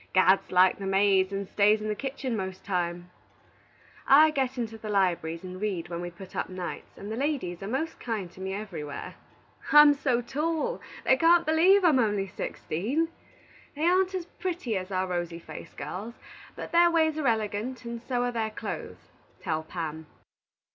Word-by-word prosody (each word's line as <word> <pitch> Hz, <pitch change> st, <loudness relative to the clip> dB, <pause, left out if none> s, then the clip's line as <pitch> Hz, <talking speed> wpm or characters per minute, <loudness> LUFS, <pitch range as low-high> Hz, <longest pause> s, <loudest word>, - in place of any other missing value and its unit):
Gad 185 Hz, +1 st, +6 dB
likes 185 Hz, +1 st, +4 dB
the 195 Hz, -, -4 dB
maids 195 Hz, -1 st, +3 dB
and 195 Hz, 0 st, -3 dB
stays 210 Hz, +2 st, +3 dB
in 215 Hz, -, -4 dB
the 215 Hz, -, 0 dB
kitchen 265 Hz, +1 st, -4 dB
most 190 Hz, -2 st, -5 dB
times. 175 Hz, -2 st, -2 dB, 1.0 s
I 310 Hz, +3 st, +7 dB
get 265 Hz, -3 st, -1 dB
into 225 Hz, -2 st, -4 dB
the 215 Hz, -, -7 dB
libraries 175 Hz, -4 st, 0 dB
and 185 Hz, +1 st, -8 dB
read 190 Hz, -5 st, -2 dB
when 170 Hz, 0 st, -4 dB
we 175 Hz, -, -4 dB
put 180 Hz, +2 st, -12 dB
up -, -, -2 dB
nights, 185 Hz, -1 st, -7 dB
and 205 Hz, +2 st, -7 dB
the -, -, -2 dB
ladies 250 Hz, -, -2 dB
are 195 Hz, -, -5 dB
most 275 Hz, +8 st, -3 dB
kind 210 Hz, -7 st, -4 dB
to 185 Hz, -, -13 dB
me 190 Hz, 0 st, -3 dB
everywhere. 175 Hz, -8 st, -6 dB, 0.6 s
"I'm 295 Hz, 0 st, +9 dB
so 265 Hz, -4 st, 0 dB
tall 315 Hz, -, -2 dB, 0.2 s
they 265 Hz, -, +5 dB
can't 335 Hz, +3 st, +5 dB
believe 360 Hz, +5 st, +5 dB
I'm 300 Hz, -6 st, +5 dB
only 205 Hz, -4 st, +1 dB
sixteen. 210 Hz, -, -2 dB, 0.7 s
They 300 Hz, -, -3 dB
aren't 370 Hz, +2 st, +3 dB
as 360 Hz, -2 st, -3 dB
pretty 345 Hz, -, -4 dB
as 185 Hz, 0 st, -3 dB
our 185 Hz, 0 st, 0 dB
rosy 175 Hz, -2 st, -3 dB
faced 170 Hz, -1 st, -11 dB
girls, 220 Hz, +6 st, -6 dB, 0.4 s
but -, -, -7 dB
their 345 Hz, 0 st, +6 dB
ways 315 Hz, -2 st, +2 dB
are 290 Hz, -, 0 dB
elegant, 225 Hz, +2 st, -1 dB
and 235 Hz, 0 st, -5 dB
so 245 Hz, 0 st, -1 dB
are 245 Hz, -, 0 dB
their 225 Hz, -2 st, -1 dB
clothes, 215 Hz, -, -7 dB, 0.3 s
tell 160 Hz, -3 st, -2 dB
Pam. 160 Hz, -1 st, -6 dB
215 Hz, 180 wpm, -28 LUFS, 185-275 Hz, 1.0 s, I'm